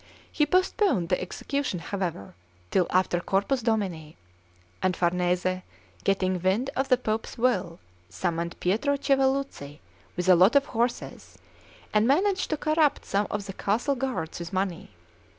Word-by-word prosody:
He 300 -2 +2
postponed 370 - +2
the 180 - +1
execution, 270 +5 -3
however, 175 - -4 0.4
till 180 - +2
after 185 -1 +2
Corpus 200 +9 0
Domini; 190 -9 -2 0.6
and 185 -1 +1
Farnese, 180 +1 +1 0.4
getting 185 -2 +1
wind 200 +9 +1
of 270 +1 -1
the 255 - +5
Pope's 225 -2 -3
will, 190 -9 +1 0.3
summoned 170 - -3
Pietro 225 +10 +1
Chiavelluzi 270 - 0 0.4
with 180 +1 -1
a 185 - +8
lot 185 +8 +5
of 280 0 +5
horses, 240 -2 -3 0.6
and 215 +1 +3
managed 375 +7 +2
to 310 - 0
corrupt 310 -1 +1
some 200 +1 0
of 205 -1 -3
the 195 - -6
castle 220 +9 0
guards 245 -13 -3
with 170 -1 -6
money. 185 -3 -2
200 Hz, 140 wpm, -27 LUFS, 180-270 Hz, 0.6 s, a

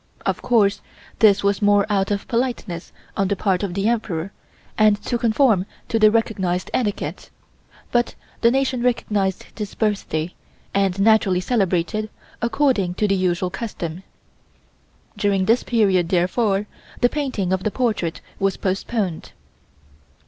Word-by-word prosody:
Of - - -1
course 205 -5 +2 0.4
this 205 -2 +5
was 200 -1 +1
more 205 -1 +4
out 200 -2 +1
of 200 -1 -2
politeness 230 -8 -2 0.2
on 195 - +1
the 200 - 0
part 190 -3 0
of 195 -4 -3
the 200 +1 0
Emperor 195 -6 -1 0.4
and 215 -1 +4
to 240 - -1
conform 220 -4 +3 0.2
to 225 - +1
the 215 0 +7
recognized 190 -5 0
etiquette, 210 -5 -2 0.6
but 240 -1 +1 0.3
the 230 - +6
nation 260 -1 0
recognized 210 -6 0
this 210 -2 -6
birthday 185 -6 -1 0.4
and 195 -1 +1
naturally 200 -3 +4
celebrated 195 0 0 0.3
according 235 -7 +1
to 210 - +1
the 195 - +2
usual 180 -1 0
custom. 175 -7 -5 1.2
During 200 -2 +1
this 230 +5 +3
period, 195 -7 +2
therefore, 195 +3 +1 0.4
the 245 - +6
painting 245 -10 -2
of 190 0 -1
the - - +1
portrait 215 -8 -1 0.2
was 195 -1 +1
postponed. 190 -2 -2
205 Hz, 135 wpm, -22 LUFS, 185-225 Hz, 1.2 s, the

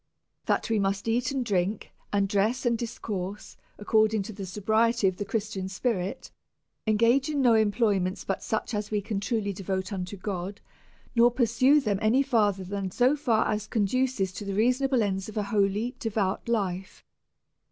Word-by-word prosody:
I - - -46
That - - 0
we 220 - +2
must 195 +1 -1
eat 240 +3 +1
and 265 -3 -2
drink, 200 -1 -1 0.2
and 200 -1 +2
di*ess 215 +6 0
and 235 -1 +3
dis 230 0 -4
j - - -19
course, 200 -1 -5 0.2
according* 215 0 +2
to 220 - -8
the 195 -1 -7
sobriety 220 +3 +2
of 185 -1 -1
the 205 - -3
Christian 200 -3 -3
spi 200 +6 -1
l 230 - +1
rit, 180 +2 -5 0.6
engage 235 +6 +3
in 295 -2 -1
no 245 -3 +5
employments 205 -4 +1
but 195 - -2
such 220 +2 -2
as 210 0 -2
we 210 - 0
can; 205 0 -3
truly 205 -1 -1
devote 190 +1 -3
unto 185 +1 -5
God, 190 0 -4 0.6
nor 235 +1 +6
pursue 245 +4 +3
them 210 -8 -1
any 235 +6 +3
further; 210 -8 +1
than 195 +1 -4
as 185 - -10
they 245 -5 +2
conduce 220 -2 0
to 185 - -7
the 200 -1 -4
reasonable 250 +3 +2
ends 195 0 -2
of 215 - -8
a 210 - +1
holy 205 +4 +1
devout 220 -3 -1
life. 190 -4 -2
210 Hz, 185 wpm, -27 LUFS, 195-235 Hz, 0.6 s, nor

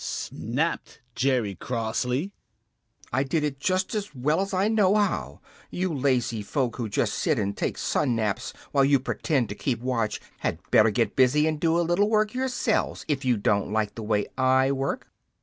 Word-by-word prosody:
snapped 145 +9 -3
Jerry 125 -7 +1
crossly. 125 - -2 0.8
"I 130 - +2
did 150 +3 0
it 140 -2 -2
just 185 +6 0
as 205 -8 -4
well 150 +7 +1
as 195 - -3
I 190 +1 +2
know 210 -3 +3
how. 195 - 0 0.3
You 185 -1 -2
lazy 125 -5 0
folks 120 +3 -2
who 115 -3 -3
just - - 0
sit - - +1
and 100 -1 -1
take - - -2
sun 130 -5 0
naps 110 -3 -1 0.2
while 140 - +4
you 140 0 +4
pretend 135 -1 -1
to - - -3
keep 120 +2 -2
watch 115 -3 -1 0.2
had - - -1
better 110 +1 +6
get 110 0 0
busy 135 +4 +4
and 155 -1 0
do 165 +1 +2
a 170 - +1
little 185 +5 +2
work 215 -1 +2
yourselves, 250 -3 -1
if 145 -3 -1
you 125 -3 +2
don't 100 0 +1
like 105 -1 0
the 115 - -7
way 105 -1 0
I 130 +1 +4
work." 135 0 -2
135 Hz, 185 wpm, -26 LUFS, 115-165 Hz, 0.8 s, better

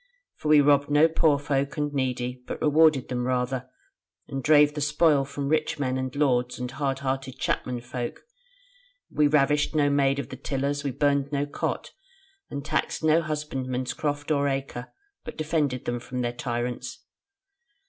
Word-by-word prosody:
For - - -6
we 150 -1 +7
robbed 145 0 +3
no 150 +2 +5
poor 160 -2 +3
folk 140 0 -1
and 145 -1 -1
needy, 125 -2 -2
but - - -5
rewarded 155 -3 +4
them 125 0 -2
rather, 130 0 -1 0.6
and 135 - -4
drave 150 -1 +5
the 150 - -4
spoil 150 -1 +3
from 140 0 -4
rich 155 0 0
men 130 -3 -1
and 130 0 -3
lords, 125 -4 +1
and 125 0 -4
hard 135 0 -2
hearted 135 -1 -2
chapmen 125 -2 -2
folk: 120 0 -5 0.9
we 150 -1 +3
ravished 145 +1 +2
no 145 -2 +3
maid 140 -1 +2
of 140 - -4
the - - -7
tillers, 140 +1 -2
we 140 - -1
burned 140 +1 +1
no 145 0 0
cot, 145 - -3 0.6
and 140 -1 -5
taxed 155 +1 -1
no 160 +1 +4
husbandman's 135 -5 -3
croft 145 0 -3
or 145 -1 +2
acre, 135 -2 -4 0.3
but 240 - -8
defended 150 -5 -1
them 120 0 -2
from 125 +1 -5
their 120 0 -1
tyrants. 120 0 -4
140 Hz, 170 wpm, -26 LUFS, 130-150 Hz, 0.9 s, we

